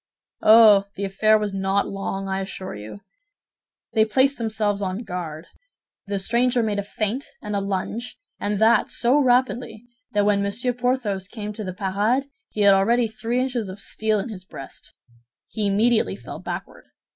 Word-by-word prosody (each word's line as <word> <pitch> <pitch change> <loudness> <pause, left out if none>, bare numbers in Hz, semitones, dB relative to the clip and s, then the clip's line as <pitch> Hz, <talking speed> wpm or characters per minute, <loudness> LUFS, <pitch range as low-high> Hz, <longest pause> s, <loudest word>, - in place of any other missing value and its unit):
"Oh! 215 -2 +7
The 200 - -4
affair 215 +3 +3
was 210 -2 -3
not 195 +1 0
long, 195 0 -4
I 190 0 -1
assure 190 0 -6
you. 105 - -9 0.9
They 220 - +5
placed 260 +5 +2
themselves 215 -3 -1
on 190 +4 -3
guard; 170 -5 -6 0.6
the 200 0 -1
stranger 240 +4 +1
made 210 -2 -1
a - - -2
feint 215 +6 -2
and 210 -1 -4
a - - +1
lunge, 200 +4 -3 0.2
and 205 0 -1
that 220 +3 +4
so 250 +5 +2
rapidly 250 -3 +1 0.3
that 205 -1 +2
when 205 -1 +3
Monsieur 215 +5 -1
Porthos 240 -6 -1
came 210 -1 -6
to 215 +1 -6
the 185 - -4
parade, 205 +9 0 0.2
he 210 - -3
had 200 -1 +7
already 230 +5 +3
three 225 +3 -2
inches 245 -5 -2
of 185 +2 -8
steel 215 +1 -1
in 225 - -4
his 190 -4 -8
breast. 135 -7 -11 0.5
He 215 -2 -1
immediately 220 +3 +2
fell - - -9
backward. - - -7
210 Hz, 170 wpm, -23 LUFS, 195-235 Hz, 0.9 s, Oh